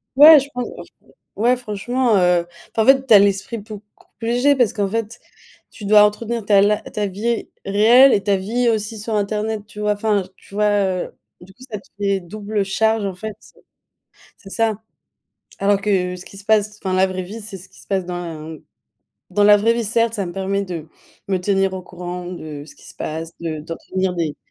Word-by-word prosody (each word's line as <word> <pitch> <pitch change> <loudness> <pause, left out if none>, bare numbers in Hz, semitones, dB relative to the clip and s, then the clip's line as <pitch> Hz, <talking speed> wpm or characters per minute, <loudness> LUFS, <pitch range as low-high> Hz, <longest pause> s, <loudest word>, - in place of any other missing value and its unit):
Ouais, 300 +2 +10
je 275 - -5
pense, 245 0 -3
enfin. - - -16 0.2
Ouais, 240 +4 +3
franchement, 240 +1 -1
heu, 180 -2 +2 0.3
enfin, 220 - +3
en - - -2
fait, 270 0 +5
tu 245 - +4
as 205 - +10
l'esprit 200 +3 +1
beaucoup 210 0 -10 0.3
plus 225 +1 -5
léger 255 +4 +3
parce 245 -6 +2
qu'en 205 -2 0
fait, 225 +2 -4 0.5
tu 210 - -10
dois 210 0 +7
entretenir 225 +2 -1
ta 200 -1 +5
li 205 +1 +4 0.2
ta 210 - -2
vie 215 +5 -2 0.2
réelle 230 +7 +6
et 200 - +1
ta 200 -1 +2
vie 235 +6 -1
aussi 220 0 -2
sur 220 +2 -5
internet, 210 +1 -1
tu 210 - -12
vois? 210 0 +1
Enfin, 205 -1 0
tu 195 - -16
vois, 210 0 +2
heu, 190 -3 0 0.3
du 190 +2 -15
coup, 255 - -25
ça 215 - -4
te 200 - -16
fait 200 -1 +1
double 205 +3 -3
charge, 220 +2 +1
en 195 - -3
fait. 215 +3 -7
C'est - - -20 0.8
c'est 195 - -14
ça. 220 -2 0 0.8
Alors 200 0 +2
que, 180 -3 0
ce 180 - -11
qui 195 - -12
se 195 - -13
passe 210 -1 +2
enfin, 190 -1 -1
la 190 +1 +4
vraie 185 0 -4
vie, 205 +5 -8
c'est 205 -2 -7
ce 185 +2 -14
qui - - -18
se - - -17
passe 190 -2 -1
dans 180 0 -4 0.4
la - - -8 0.7
dans 205 +2 +2
la 205 0 +8
vraie 220 +3 +2
vie, 235 0 -2
certes. 230 +1 +1
Ça 200 -4 -2
me 175 - -6
permet 195 +2 -1
de 170 -5 -6 0.4
me 190 -1 +1
tenir 195 0 +1
au 190 - -4
courant 180 0 -7
de 155 -5 -7
ce 150 - -14
qui - - -19
se - - -13
passe, 160 +1 -5
de 160 -2 -4
d'entretenir 185 +3 -3
des 165 -4 -2
205 Hz, 220 wpm, -20 LUFS, 190-220 Hz, 0.8 s, Ouais